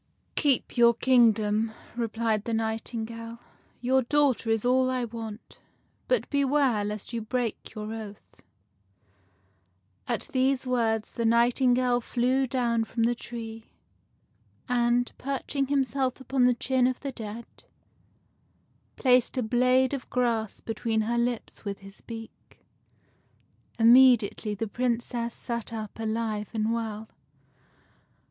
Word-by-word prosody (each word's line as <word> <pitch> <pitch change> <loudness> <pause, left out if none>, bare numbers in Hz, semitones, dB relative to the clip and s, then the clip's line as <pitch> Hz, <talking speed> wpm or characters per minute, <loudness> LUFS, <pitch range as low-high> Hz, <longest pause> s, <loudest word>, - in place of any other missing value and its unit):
" - - -45
Keep 280 -5 +1
your 235 -1 +6
kingdom," 220 -3 +3 0.2
replied 225 -2 -1
the 230 - -1
nightingale. 230 +1 -4 0.2
" - - -36
Your 260 +2 +3
daughter 265 -3 +1
is 225 0 +1
all 255 +1 +3
I 255 -1 -1
want. 225 -1 -8 0.5
But - - +1
beware 275 -6 +2
lest 210 +2 -5
you 230 - -2
break 235 0 -3
your 215 +1 -5
oath." 215 -2 -10 1.7
At 235 -2 -2
these 265 0 +1
words 225 -4 0
the 235 - -3
nightingale 245 +1 +3
flew 255 +3 +1
down 235 -3 0
from 230 +1 -2
the 235 +1 +3
tree, 225 -2 -8 1.0
and, 245 0 +1
perching 275 0 -2
himself 270 -2 0
upon 260 0 +1
the 250 -1 +4
chin 255 0 +1
of 255 -1 -3
the 275 - -4
dead, 225 -1 -7 1.5
placed 250 0 +3
a 250 - +1
blade 255 +3 +3
of 270 -3 -5
grass 230 -4 -1
between 225 0 -1
her 235 +2 0
lips 240 -1 -3
with 200 -2 -4
his 195 0 -14
beak. 225 -1 -11 1.1
Immediately 235 -3 +5
the 225 +3 -3
Princess 235 +1 -1
sat 235 -2 -3
up 220 -1 -6
alive 220 -1 -2
and 220 +1 0
well. 220 -2 -4
235 Hz, 125 wpm, -27 LUFS, 225-255 Hz, 1.7 s, your